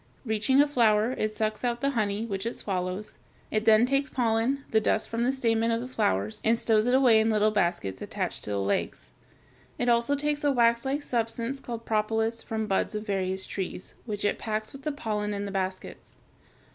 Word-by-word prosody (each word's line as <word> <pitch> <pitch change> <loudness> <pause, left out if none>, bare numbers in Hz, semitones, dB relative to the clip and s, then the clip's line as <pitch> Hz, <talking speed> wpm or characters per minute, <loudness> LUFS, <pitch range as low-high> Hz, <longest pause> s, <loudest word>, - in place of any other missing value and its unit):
Reaching 220 +4 +2
a 290 - +6
flower 225 -4 +3
it 215 -4 -1
sucks 215 +1 -2
out 240 -1 0
the 275 - +1
honey, 215 -3 -1
which 200 -1 -3
it 235 - -3
swallows. 185 +1 -4 0.3
It 215 0 0
then 220 +1 +6
takes 275 +2 +1
pollen, 240 +2 0
the 220 - +3
dust 215 - +1
from 230 +1 -1
the 250 - +2
stamen 230 -3 +1
of 230 0 +1
the 245 - -5
flowers, 100 - -1
and 230 +1 +3
stows 220 0 +2
it 250 - +4
away 250 -5 +6
in 220 +1 +2
little 215 0 +3
baskets 170 - -1
attached - - -4
to - - -6
the 100 - -1
legs. 100 -9 -2 0.7
It 245 - 0
also 235 +4 +3
takes 295 +1 -1
a 290 - +3
waxlike 245 +3 +2
substance 235 +1 0
called 235 -3 -7
propolis 220 +1 0
from 220 -1 -3
buds 205 +1 0
of 210 0 -4
various 190 -2 -2
trees, 185 -1 -5
which 205 -2 -3
it - - 0
packs 215 0 -3
with 275 - -10
the 300 - -2
pollen 210 -6 -3
in 200 0 -3
the 200 - -5
baskets. 190 -1 -5
225 Hz, 200 wpm, -27 LUFS, 210-245 Hz, 0.7 s, a